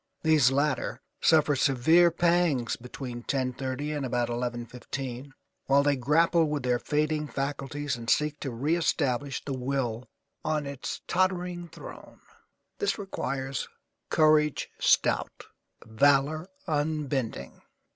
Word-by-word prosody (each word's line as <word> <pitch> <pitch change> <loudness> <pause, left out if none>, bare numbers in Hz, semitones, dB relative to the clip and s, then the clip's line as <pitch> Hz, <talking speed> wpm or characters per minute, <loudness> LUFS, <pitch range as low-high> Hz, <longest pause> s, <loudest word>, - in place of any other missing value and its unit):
These 155 -5 +5
latter 140 +1 0 0.2
suffer 155 -2 +4
severe 160 +6 +4
pangs 170 -7 +1
between 125 0 -7
10:30 130 +3 -2
and 145 - -3
about 120 -2 -1
11:15 120 +2 -5 0.4
while 140 +1 +4
they 145 0 +3
grapple 160 +6 +3
with 150 -3 -2
their 125 -1 +1
fading 150 +1 0
faculties 140 0 -3
and 115 -1 -6
seek 150 0 +1
to 135 - -4
reëstablish 140 0 0
the 140 - -3
will 130 -2 -2 0.3
on 155 -2 -1
its 140 -1 -5
tottering 180 -1 0
throne. - - -12 0.6
This 410 - 0
requires 135 - -3 0.4
courage 155 -1 +3
stout, - - +2 0.4
valour 145 - +2 0.2
unbending. 150 -5 -2
140 Hz, 110 wpm, -28 LUFS, 130-155 Hz, 0.6 s, These